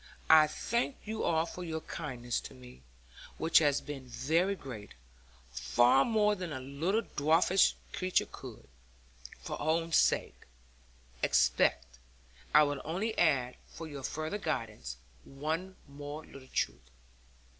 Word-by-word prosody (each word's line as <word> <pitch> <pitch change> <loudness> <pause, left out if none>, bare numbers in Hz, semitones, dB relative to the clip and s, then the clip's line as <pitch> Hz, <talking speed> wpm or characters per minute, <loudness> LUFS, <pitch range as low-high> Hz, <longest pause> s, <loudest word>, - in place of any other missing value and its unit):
I 155 -1 +8
thank 235 - -1
you 220 +1 -4
all 160 -1 +2
for 180 +1 -7
your 160 -2 -4
kindness 125 -7 -4
to - - -9
me, 65 0 -14 0.6
which 160 - +5
has 145 -3 +2
been 135 -3 -8
very 160 +11 +1
great, 115 - -9 0.6
far 120 - +4
more 210 -2 +3
than 180 -5 -5
a 130 - -4
little 150 - -1
dwarfish 165 +5 +3 0.2
creature 185 0 +1
could, - - -11 0.7
for - - -6
her - - -4
own 165 +2 +1
sake, - - +2 0.7
expect. 60 0 +2 0.5
I 150 - +7
will 145 -2 -1
only 195 +8 -2
add 130 -7 +2
for 165 - -9
your 145 -3 -7
further 155 +8 -3
guidance 110 - -4 0.3
one 160 +7 -4
more 145 +2 -8
little 130 -1 -13
truth. - - -2
150 Hz, 135 wpm, -32 LUFS, 130-170 Hz, 0.7 s, I